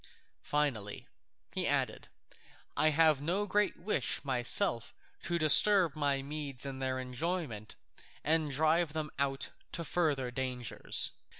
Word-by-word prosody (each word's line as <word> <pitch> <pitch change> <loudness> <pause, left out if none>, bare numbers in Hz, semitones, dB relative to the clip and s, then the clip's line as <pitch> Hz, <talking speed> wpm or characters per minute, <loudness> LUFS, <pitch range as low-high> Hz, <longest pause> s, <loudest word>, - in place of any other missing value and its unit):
Finally," 130 -9 -2 0.5
he - - -1
added, - - -1 0.7
"I 155 - +4
have 155 -2 +3
no 180 +7 -1
great 205 +1 0
wish 180 -5 -1
myself 120 -3 +3 0.3
to 170 - 0
disturb 170 +2 +5
my 140 -2 0
Medes 140 -3 -4
in 135 -1 -6
their 130 -1 -2
enjoyment, 130 - -4 0.5
and 155 0 +1
drive 155 +3 +1
them 155 -1 -4
out 135 -1 -2 0.2
to 170 - -3
further 145 -7 -1
dangers." 125 -2 -1
145 Hz, 120 wpm, -32 LUFS, 130-165 Hz, 0.7 s, disturb